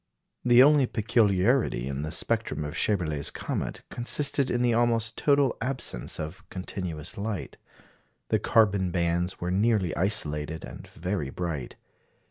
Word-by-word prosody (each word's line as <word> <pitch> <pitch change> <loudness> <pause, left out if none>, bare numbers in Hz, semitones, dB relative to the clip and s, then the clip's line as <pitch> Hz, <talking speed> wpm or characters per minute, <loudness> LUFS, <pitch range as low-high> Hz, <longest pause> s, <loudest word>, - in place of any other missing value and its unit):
The 120 +1 +7
only 145 -2 +5
peculiarity 110 - +2
in 70 0 -3
the 75 +1 -4
spectrum 75 - -1
of 75 - -5
Schaeberle's 80 -8 0
comet - - -4
consisted 140 +2 +1
in 120 0 +1
the 120 -1 +3
almost 115 -1 +1
total 140 -3 +3
absence 125 - -3
of 75 0 -6
continuous 90 -3 -5
light. 105 -2 -4 0.7
The - - +2
carbon 100 -4 +3
bands 85 +1 -1
were 90 +1 -2
nearly 100 -2 +1
isolated 80 -5 0
and - - -10
very 90 -3 -3
bright. 80 -5 -4
95 Hz, 130 wpm, -27 LUFS, 80-120 Hz, 0.7 s, The